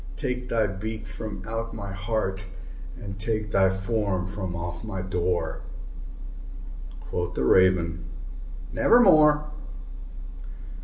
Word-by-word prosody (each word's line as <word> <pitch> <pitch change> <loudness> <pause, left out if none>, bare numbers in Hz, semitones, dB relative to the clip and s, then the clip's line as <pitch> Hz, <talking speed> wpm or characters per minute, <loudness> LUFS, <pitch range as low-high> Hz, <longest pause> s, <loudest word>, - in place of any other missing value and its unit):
Take 125 - -3
thy 115 -2 +2
beak 110 +3 -5
from 110 -1 -7
out 115 0 -4
my 100 -3 -5
heart, 100 -2 -2 0.5
and 100 -4 -7
take 110 0 -2
thy 95 -2 +4
form 95 -1 -1
from 95 -2 -4
off 85 +1 -5
my 95 -4 -4
door!" 90 -1 -1 1.4
Quoth 90 0 -3
the 65 - 0
Raven, 85 -1 +3 0.7
"Nevermore." 155 -10 +6
100 Hz, 105 wpm, -26 LUFS, 95-110 Hz, 1.4 s, Nevermore